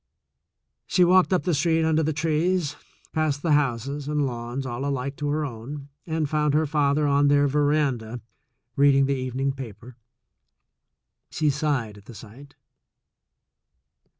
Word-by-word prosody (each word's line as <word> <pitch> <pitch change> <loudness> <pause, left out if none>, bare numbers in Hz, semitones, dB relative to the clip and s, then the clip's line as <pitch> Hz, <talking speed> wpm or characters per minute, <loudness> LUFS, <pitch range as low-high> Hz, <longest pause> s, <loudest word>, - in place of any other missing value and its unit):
She 180 - +3
walked 185 +1 +4
up 185 - +2
the 180 - 0
street 160 +2 +2
under 160 0 +2
the 155 0 0
trees, 160 +1 0 0.4
past 155 -2 -1
the 165 - +1
houses 140 0 0
and 150 -1 0
lawns 120 +1 -4
all 125 +1 -4
alike 140 0 -2
to 145 - -3
her 150 +1 0
own, 135 +3 -8 0.2
and 160 -2 -1
found 150 0 +1
her 155 +1 +3
father 145 0 +1
on 145 0 +3
their 145 0 +4
veranda 140 -5 0 0.6
reading 140 -1 +4
the 140 - 0
evening 130 +1 -2
paper. 125 -2 -10 1.3
She 155 -2 +1
sighed 135 -8 -2
at 100 - -21
the 120 - -12
sight. 125 +8 -13
145 Hz, 145 wpm, -24 LUFS, 130-155 Hz, 1.3 s, walked